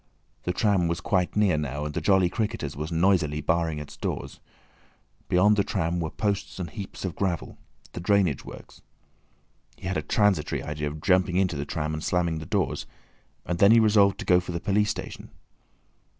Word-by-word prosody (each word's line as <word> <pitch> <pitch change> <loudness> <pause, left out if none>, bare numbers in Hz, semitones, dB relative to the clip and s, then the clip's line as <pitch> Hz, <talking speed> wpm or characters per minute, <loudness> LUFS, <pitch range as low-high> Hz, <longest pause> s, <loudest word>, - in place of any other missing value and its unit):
The 90 - +1
tram 95 -2 +2
was 85 0 -1
quite 90 -3 0
near 100 -7 +3
now, 75 0 -3
and 75 - -4
the - - -2
"Jolly 95 -3 +4
Cricketers" 90 -8 -3
was 75 +3 -5
noisily 85 -3 +2
barring 80 +1 0
its 75 -1 -8
doors. - - -5 0.9
Beyond 105 +4 +4
the 100 - +3
tram 85 0 -1
were 80 -2 -2
posts 100 0 -2
and 90 -3 -5
heaps 100 -3 -7
of 90 -4 -4
gravel—the 90 -2 -5
drainage 90 -5 +2
works. - - -12 1.0
He - - -11
had 95 - -1
a - - 0
transitory 95 -8 +1
idea 75 0 -3
of 75 +1 -6
jumping 90 0 +2
into 95 -4 +1
the 70 0 -3
tram 75 0 -3
and 80 +1 -4
slamming 85 -3 0
the 80 - -8
doors, 100 -3 -1 0.6
and 85 -1 -2
then 100 +2 +7
he 115 - +7
resolved 105 -3 +4
to - - -6
go 90 -1 +5
for 90 0 -6
the 85 - -2
police 105 +2 +1
station. - - -6
90 Hz, 185 wpm, -26 LUFS, 80-100 Hz, 1.0 s, then